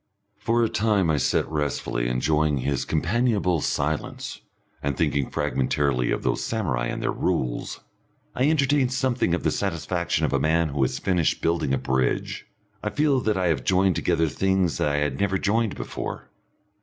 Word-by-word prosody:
For 115 Hz, +2 st, +1 dB
a -, -, +3 dB
time 105 Hz, -6 st, +1 dB
I 75 Hz, -, +1 dB
sit 70 Hz, -, +1 dB
restfully 70 Hz, -5 st, -2 dB
enjoying 75 Hz, +4 st, +1 dB
his 70 Hz, +1 st, -1 dB
companionable 90 Hz, 0 st, +1 dB
silence, 75 Hz, +2 st, -2 dB, 0.4 s
and 70 Hz, -2 st, -2 dB
thinking 70 Hz, -2 st, 0 dB
fragmentarily 65 Hz, -1 st, 0 dB
of -, -, -1 dB
those -, -, 0 dB
samurai 70 Hz, -, -1 dB
and -, -, -4 dB
their -, -, +1 dB
Rules. -, -, -2 dB, 0.5 s
I 130 Hz, +4 st, +2 dB
entertain 140 Hz, -3 st, +2 dB
something 130 Hz, -8 st, +1 dB
of -, -, -5 dB
the -, -, +2 dB
satisfaction 85 Hz, -3 st, -1 dB
of 70 Hz, -, -2 dB
a 70 Hz, -, +2 dB
man 80 Hz, +3 st, +2 dB
who 70 Hz, 0 st, -2 dB
has 65 Hz, -, +1 dB
finished 90 Hz, -4 st, 0 dB
building 85 Hz, -4 st, +1 dB
a 70 Hz, -, +2 dB
bridge; 65 Hz, 0 st, -1 dB, 0.3 s
I 105 Hz, -, -2 dB
feel 140 Hz, +5 st, +2 dB
that 110 Hz, -4 st, 0 dB
I 90 Hz, -2 st, +1 dB
have 70 Hz, -7 st, 0 dB
joined 95 Hz, +4 st, +3 dB
together 80 Hz, -2 st, +1 dB
things 95 Hz, +3 st, 0 dB
that -, -, +2 dB
I 75 Hz, -, 0 dB
had 75 Hz, -2 st, -1 dB
never 100 Hz, -1 st, +1 dB
joined 110 Hz, +3 st, 0 dB
before. -, -, -6 dB
85 Hz, 170 wpm, -25 LUFS, 70-105 Hz, 0.5 s, a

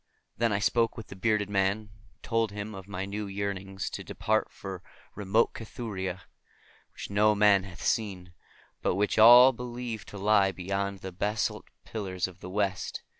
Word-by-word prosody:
Then 115 Hz, -1 st, +1 dB
I 100 Hz, -, +2 dB
spoke 115 Hz, +3 st, +1 dB
with 115 Hz, -, -8 dB
the -, -, -8 dB
bearded 105 Hz, +1 st, +1 dB
man, 100 Hz, 0 st, +1 dB
and 105 Hz, -1 st, -14 dB, 0.3 s
told 115 Hz, -2 st, 0 dB
him 105 Hz, +1 st, -6 dB
of 95 Hz, -1 st, -9 dB
my 95 Hz, -1 st, -4 dB
new 100 Hz, +1 st, -4 dB
yearnings 95 Hz, -1 st, -4 dB
to -, -, -6 dB
depart 110 Hz, 0 st, 0 dB
for 95 Hz, -2 st, -7 dB, 0.3 s
remote 105 Hz, +3 st, +1 dB
Cathuria, 95 Hz, -5 st, -5 dB, 0.7 s
which -, -, -8 dB
no 105 Hz, +1 st, +4 dB
man 100 Hz, -2 st, +5 dB
hath 90 Hz, -3 st, -10 dB
seen, 95 Hz, -5 st, -1 dB, 0.5 s
but -, -, +1 dB
which 105 Hz, +2 st, +1 dB
all 120 Hz, +4 st, +10 dB
believe 120 Hz, -2 st, -5 dB
to 105 Hz, -, -9 dB
lie 100 Hz, -1 st, +3 dB
beyond 100 Hz, +2 st, -3 dB
the 95 Hz, -, -6 dB
basalt 105 Hz, +4 st, -2 dB, 0.2 s
pillars 95 Hz, -5 st, -3 dB
of 90 Hz, -1 st, -13 dB
the 90 Hz, -, -8 dB
West. 95 Hz, -1 st, -2 dB
100 Hz, 170 wpm, -28 LUFS, 95-110 Hz, 0.7 s, all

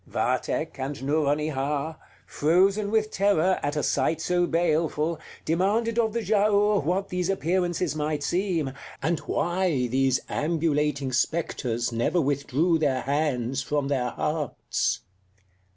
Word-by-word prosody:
Vathek -, -, -1 dB
and 135 Hz, +2 st, -3 dB
Nouronihar, 150 Hz, 0 st, 0 dB, 0.3 s
frozen 195 Hz, +7 st, +2 dB
with 215 Hz, 0 st, +1 dB
terror 190 Hz, -2 st, +2 dB
at 145 Hz, +1 st, -2 dB
a 150 Hz, -, -1 dB
sight 160 Hz, -, +1 dB
so 175 Hz, 0 st, +1 dB
baleful, 160 Hz, -1 st, 0 dB, 0.3 s
demanded 210 Hz, +8 st, +1 dB
of 220 Hz, -2 st, +1 dB
the 235 Hz, -, -1 dB
Giaour 205 Hz, -1 st, +3 dB
what 185 Hz, +6 st, -1 dB
these 180 Hz, 0 st, -1 dB
appearances 180 Hz, -3 st, 0 dB
might 150 Hz, -1 st, -2 dB
seem, 175 Hz, -7 st, 0 dB, 0.3 s
and 165 Hz, 0 st, +1 dB
why 175 Hz, -7 st, 0 dB
these 130 Hz, +1 st, +2 dB
ambulating 150 Hz, -3 st, 0 dB
spectres 125 Hz, -4 st, -1 dB
never 115 Hz, +10 st, +1 dB
withdrew 145 Hz, +3 st, +1 dB
their 135 Hz, -4 st, +1 dB
hands 135 Hz, -3 st, 0 dB
from 145 Hz, -1 st, -1 dB
their 125 Hz, -3 st, 0 dB
hearts. 150 Hz, +2 st, -2 dB
155 Hz, 120 wpm, -26 LUFS, 140-180 Hz, 0.3 s, Giaour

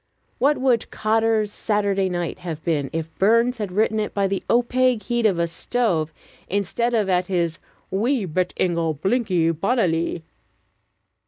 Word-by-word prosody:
What 290 Hz, +3 st, +3 dB
would 255 Hz, -3 st, +1 dB
"Cotter's 220 Hz, -1 st, +1 dB
Saturday 200 Hz, -3 st, 0 dB
Night" 175 Hz, 0 st, -3 dB
have 165 Hz, -3 st, -6 dB
been, 145 Hz, -5 st, 0 dB
if 160 Hz, 0 st, -4 dB
Burns 230 Hz, +4 st, +3 dB
had 205 Hz, -3 st, -3 dB
written 215 Hz, +3 st, +1 dB
it 210 Hz, -, -3 dB
by 200 Hz, -1 st, +2 dB
the 195 Hz, 0 st, -2 dB
opaque 245 Hz, -1 st, +2 dB
heat 240 Hz, -2 st, +1 dB
of 190 Hz, -5 st, 0 dB
a 170 Hz, -, +2 dB
stove 170 Hz, -2 st, -1 dB, 0.4 s
instead 205 Hz, +5 st, 0 dB
of 215 Hz, -3 st, +1 dB
at 180 Hz, -1 st, +1 dB
his 170 Hz, -3 st, -1 dB, 0.3 s
"Wee 225 Hz, +4 st, +1 dB
bit 180 Hz, +2 st, -1 dB
ingle 170 Hz, -3 st, 0 dB
blinkin' 185 Hz, -, +1 dB
bonnilie?" 170 Hz, -3 st, 0 dB
195 Hz, 150 wpm, -22 LUFS, 170-230 Hz, 0.4 s, What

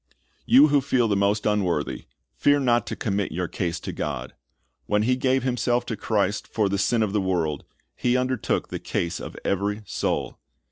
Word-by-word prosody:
You 145 Hz, +4 st, +7 dB
who 145 Hz, -1 st, +4 dB
feel 130 Hz, -3 st, +2 dB
the 105 Hz, -, +1 dB
most 100 Hz, +1 st, +1 dB
unworthy, 105 Hz, -5 st, 0 dB, 0.3 s
fear 145 Hz, 0 st, +3 dB
not 120 Hz, -3 st, +2 dB
to -, -, -3 dB
commit 100 Hz, -3 st, -1 dB
your 90 Hz, +1 st, -2 dB
case 85 Hz, 0 st, -3 dB
to -, -, -5 dB
God. -, -, -4 dB, 0.5 s
When 105 Hz, 0 st, +2 dB
He 125 Hz, +3 st, +2 dB
gave 130 Hz, 0 st, +1 dB
Himself 125 Hz, -1 st, 0 dB
in 110 Hz, -, -3 dB
Christ 105 Hz, -1 st, 0 dB
for 105 Hz, -3 st, 0 dB
the 100 Hz, 0 st, -1 dB
sin 110 Hz, +3 st, +2 dB
of 100 Hz, -2 st, -2 dB
the 105 Hz, -, +2 dB
world, 85 Hz, -6 st, -1 dB, 0.3 s
He 125 Hz, 0 st, +1 dB
undertook 130 Hz, -2 st, -1 dB
the -, -, -4 dB
case 85 Hz, +1 st, -2 dB
of -, -, -8 dB
every 100 Hz, +2 st, -1 dB
soul. -, -, -2 dB
105 Hz, 185 wpm, -25 LUFS, 100-125 Hz, 0.5 s, You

